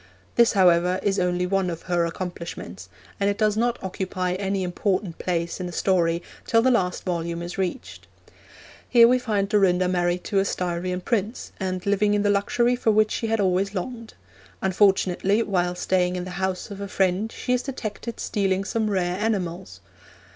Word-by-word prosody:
This, 235 -1 +4
however, 180 -1 +4
is 200 -1 +1
only 180 0 +1
one 190 0 0
of 165 -1 -6
her 175 -2 +1
accomplishments, 170 - -7 0.3
and 200 0 +2
it 200 - -1
does 215 -1 +2
not 240 +2 +1
occupy 185 -1 -2
any 195 0 -1
important 185 0 -1
place 170 -1 -2
in 180 - -3
the - - -6
story 170 -1 +1 0.2
till 230 0 +4
the 260 - +4
last 180 -7 0
volume 170 -1 -2
is 175 +3 -6
reached. 190 +6 -4 0.8
Here 235 -1 +7
we 255 +1 +3
find 210 -5 0
Dorinda 185 -3 +3
married 175 0 0
to 200 - 0
a - - +3
Styrian 180 -1 -2
Prince, 220 +2 -2
and 185 -2 -3
living 205 +1 +2
in 205 - +1
the 205 - +3
luxury 235 +5 +2
for 245 - 0
which 215 0 +3
she 225 - -2
had 225 0 0
always 195 +1 +1
longed. 230 +4 -5 0.5
Unfortunately, 195 +2 +2
while 180 -3 0
staying 180 0 +1
in 180 - -3
the 185 - -7
house 190 +3 -2
of 200 0 -7
a 200 - -4
friend 190 +3 0
she 250 - -2
is 250 - +1
detected 235 -3 -6
stealing 195 -2 0
some 220 +1 -1
rare 180 -2 0
enamels. 190 -5 -3
190 Hz, 180 wpm, -24 LUFS, 180-210 Hz, 0.8 s, Here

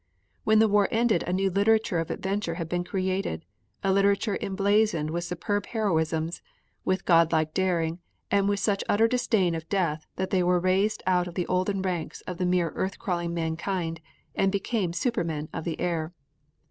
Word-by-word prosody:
When 220 0 +5
the 220 +1 +6
war 205 -1 +3
ended 225 -5 +2
a - - -1
new 190 +1 +1
literature 205 -1 +2
of 165 - -3
adventure 190 -3 -2
had 165 -2 -4
been 175 +1 -1
created, 185 - -2 0.4
a 195 - +2
literature 200 +1 +2
emblazoned 195 -5 +1
with 170 +1 -2
superb 200 +4 -2
heroisms, 165 -6 -1 0.4
with 185 0 0
God 165 -2 +5
like 155 -1 +1
daring, 175 -3 0 0.3
and 200 0 +3
with 200 0 +1
such 200 0 +1
utter 220 +2 +4
disdain 220 -7 +1
of 165 0 -5
death 165 -6 -1
that 190 0 -3
they 190 -2 +3
were 180 0 +3
raised 195 +4 +1
out 180 -1 +2
of 175 - -9
the 180 - -1
olden 185 +1 0
ranks 175 -4 -3
of 180 -2 -7
mere 180 -2 +2
earth 190 +1 -3
crawling 175 -2 -2
mankind 165 0 -2 0.3
and 195 - +2
became 200 -2 -1
supermen 165 - -2
of - - -5
the 170 - -3
air. 170 -1 -2
185 Hz, 175 wpm, -27 LUFS, 170-200 Hz, 0.4 s, the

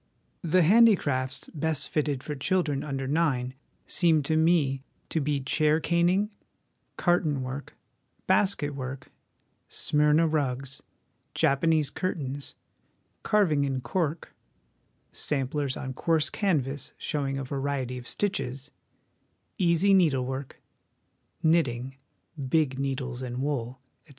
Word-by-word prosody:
The 175 +1 +3
Handicrafts 155 - +3
best 160 -2 -1
fitted 145 -3 -1
for 150 - -4
children 150 -1 0
under 135 -2 -3
nine 135 -5 0 0.3
seem 160 -4 +3
to 155 +3 0
me 155 -5 +3 0.3
to 160 - 0
be 145 0 0
chair 155 +3 +2
caning, 175 +5 +2 0.7
carton 160 -6 +1
work, 130 +3 -6 0.5
basket 190 -6 +2
work, 130 -1 -6 0.6
Smyrna 150 +2 +2
rugs, 135 -3 -2 0.5
Japanese 150 0 +2
curtains, 145 -6 -3 0.7
carv 205 -5 +3
ing 145 -1 +2
in 135 -2 -1
cork, 165 0 -2 0.8
samplers 140 -1 -2
on 130 -1 -5
coarse 155 +2 +1
canvas 145 - -1
showing 135 -2 -2
a 135 - -3
variety 135 -2 -3
of 120 - -11
stitches, 135 -10 -2 0.9
easy 180 +2 +4
needlework, 135 -7 +1 0.8
knitting 135 -6 +1 0.5
(big 140 -3 +1
needles 130 -2 -3
and 125 -1 -5
wool), 130 -3 -2 0.2
etc. - - -30
145 Hz, 110 wpm, -27 LUFS, 135-165 Hz, 0.9 s, easy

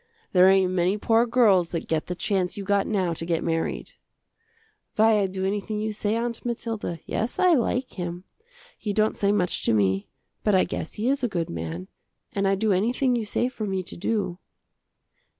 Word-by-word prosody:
There 185 0 +7
ain't 190 -1 +4
many 185 +2 +1
poor 225 +3 +3
girls 210 -8 +4
that 165 - -4
get 160 -1 -1
the 180 - -3
chance 190 -1 -1
you 200 - -4
got 200 0 +1
now 190 -5 0
to 165 - -6
get 165 -1 -1
married." 165 -1 -2 1.0
"Why, 220 0 +5
I 195 - +2
do 190 0 -3
anything 210 +2 -2
you 215 0 -2
say, 210 +1 -1
Aunt 235 0 -3
Mathilda. 225 -7 -3
Yes, 225 +3 -2
I 365 -2 +5
like 250 -1 0
him. 175 0 -4 0.6
He 210 -2 -2
don't 215 +1 +2
say 200 0 +2
much 185 -4 0
to - - +3
me, 95 -1 +1 0.3
but 210 -2 +3
I 185 - +5
guess 160 - -4
he 215 +3 -2
is 270 0 +1
a - - +3
good 170 -4 -2
man, 85 +2 -5 0.5
and 195 -1 +1
I 195 - +3
do 215 +2 +1
anything 245 +7 +2
you 230 -2 -1
say 240 +4 0
for 235 -4 -5
me 190 -1 -1
to - - -9
do." 190 -2 -2
200 Hz, 200 wpm, -25 LUFS, 180-225 Hz, 1.0 s, There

